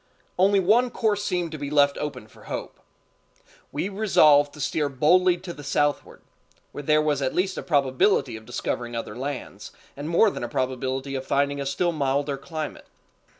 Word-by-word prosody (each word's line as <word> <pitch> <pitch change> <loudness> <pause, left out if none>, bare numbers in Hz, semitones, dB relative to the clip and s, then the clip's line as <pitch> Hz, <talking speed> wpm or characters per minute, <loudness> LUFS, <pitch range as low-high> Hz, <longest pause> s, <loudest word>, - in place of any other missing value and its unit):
Only 195 +2 +5
one 225 +7 +3
course 215 -4 0
seemed 180 -4 -1
to 155 - -6
be 140 -1 -4
left 140 -1 +3
open 150 -7 -5
for - - -18
hope. - - -6 0.9
We 150 +6 -2
resolved 155 -8 +4
to - - -12
steer 150 0 -1
boldly 175 +7 +3
to 175 0 -8
the 145 - -11
southward, 145 +1 -1 0.5
where - - -6
there 155 +1 +3
was 150 -2 0
at 130 - -1
least 190 +1 0
a - - -4
probability 140 - +2
of 110 0 -11
discovering 120 -1 -3
other 115 -2 -5
lands, 135 +1 -6 0.2
and 145 +3 -6
more 195 +5 +4
than - - -6
a 120 - -3
probability 130 +2 -2
of 130 -1 -3
finding 140 0 +1
a 140 - -3
still 170 +6 0
milder 140 -1 0
climate. 155 +2 -6
145 Hz, 180 wpm, -25 LUFS, 135-175 Hz, 0.9 s, Only